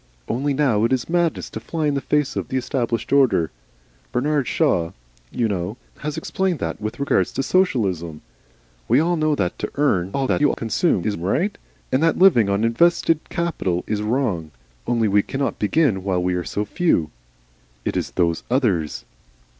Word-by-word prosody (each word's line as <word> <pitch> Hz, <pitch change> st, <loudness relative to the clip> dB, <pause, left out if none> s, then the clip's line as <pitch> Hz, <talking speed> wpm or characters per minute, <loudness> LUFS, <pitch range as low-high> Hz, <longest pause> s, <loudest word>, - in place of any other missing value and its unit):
Only 140 Hz, +4 st, -1 dB
now 130 Hz, -7 st, +2 dB
it 115 Hz, -, +2 dB
is 130 Hz, -2 st, 0 dB
madness 170 Hz, -1 st, 0 dB
to -, -, -5 dB
fly 160 Hz, -2 st, -3 dB
in 145 Hz, -, +2 dB
the 140 Hz, -, -1 dB
face 150 Hz, 0 st, 0 dB
of -, -, -3 dB
the 130 Hz, -, -2 dB
established 120 Hz, -2 st, -2 dB
order. 115 Hz, -, +3 dB, 0.6 s
Bernard 140 Hz, +2 st, 0 dB
Shaw, 90 Hz, -, +1 dB, 0.4 s
you 120 Hz, -, 0 dB
know, 100 Hz, +2 st, -3 dB, 0.2 s
has 150 Hz, -1 st, -4 dB
explained 190 Hz, -3 st, -1 dB
that 80 Hz, -2 st, -4 dB
with 110 Hz, +4 st, -4 dB
regard 140 Hz, -, +2 dB
to 135 Hz, -, -3 dB
Socialism. 95 Hz, -, 0 dB, 0.6 s
We 120 Hz, +4 st, +4 dB
all 170 Hz, +3 st, +2 dB
know 155 Hz, -2 st, +1 dB
that 90 Hz, -10 st, -2 dB
to -, -, -3 dB
earn 100 Hz, -12 st, +1 dB
all 135 Hz, -1 st, +1 dB
you 145 Hz, 0 st, +3 dB
consume 115 Hz, -, 0 dB
is 105 Hz, -, 0 dB
right, 155 Hz, -, 0 dB, 0.4 s
and 130 Hz, -, +2 dB
that 165 Hz, 0 st, +3 dB
living 140 Hz, -, +5 dB
on 100 Hz, +2 st, +1 dB
invested 165 Hz, +6 st, +3 dB
capital 95 Hz, -, -1 dB
is 105 Hz, -1 st, -2 dB
wrong. 105 Hz, -, -1 dB, 0.4 s
Only 115 Hz, -2 st, +2 dB
we 100 Hz, 0 st, +4 dB
cannot 135 Hz, +6 st, -3 dB
begin 105 Hz, -, +2 dB
while 95 Hz, -2 st, 0 dB
we 90 Hz, 0 st, +1 dB
are 90 Hz, -1 st, -1 dB
so 105 Hz, +4 st, -3 dB
few. 105 Hz, -, +1 dB, 0.7 s
It -, -, -1 dB
is -, -, -1 dB
Those 85 Hz, -2 st, 0 dB
Others." 105 Hz, -, 0 dB
120 Hz, 175 wpm, -22 LUFS, 100-150 Hz, 0.7 s, living